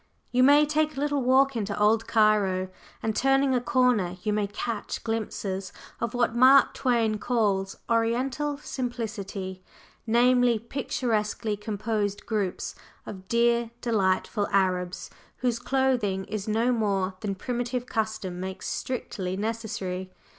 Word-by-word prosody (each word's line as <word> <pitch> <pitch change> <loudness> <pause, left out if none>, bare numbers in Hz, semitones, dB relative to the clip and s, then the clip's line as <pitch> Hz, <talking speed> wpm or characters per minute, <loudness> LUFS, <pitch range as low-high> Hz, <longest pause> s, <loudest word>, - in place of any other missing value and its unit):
You 250 - +3
may 290 +3 +7
take 305 0 0
a - - -2
little 290 -1 0
walk 265 +1 +4
into 205 -3 -2
"Old" 220 +2 +3
Cairo, 205 -4 +2 0.3
and 220 -1 -1
turning 270 +1 +3
a 250 - +2
corner 240 -8 +2
you 210 - 0
may 210 -1 0
catch 210 +2 -4
glimpses 200 -4 -3 0.3
of 235 +1 -2
what 240 -1 +1
Mark 260 +2 +6
Twain 230 -4 +1
calls 200 -6 0
"Oriental 250 +6 0
simplicity," 210 -9 -5 0.5
namely, 245 +1 +4
picturesquely 225 -3 -2
composed 210 0 -2
groups 205 -5 -2 0.3
of 190 -1 -9
"dear 235 0 +2
delightful" 205 -2 0
Arabs 185 -2 0 0.3
whose 245 -2 0
clothing 245 -8 0
is 215 -1 -5
no 225 +3 +2
more 200 -5 0
than 200 -1 -3
primitive 245 +3 -3
custom 220 -6 -3
makes 190 0 -5
strictly 190 -7 -3
necessary. 195 -4 -3
225 Hz, 125 wpm, -27 LUFS, 200-245 Hz, 0.5 s, may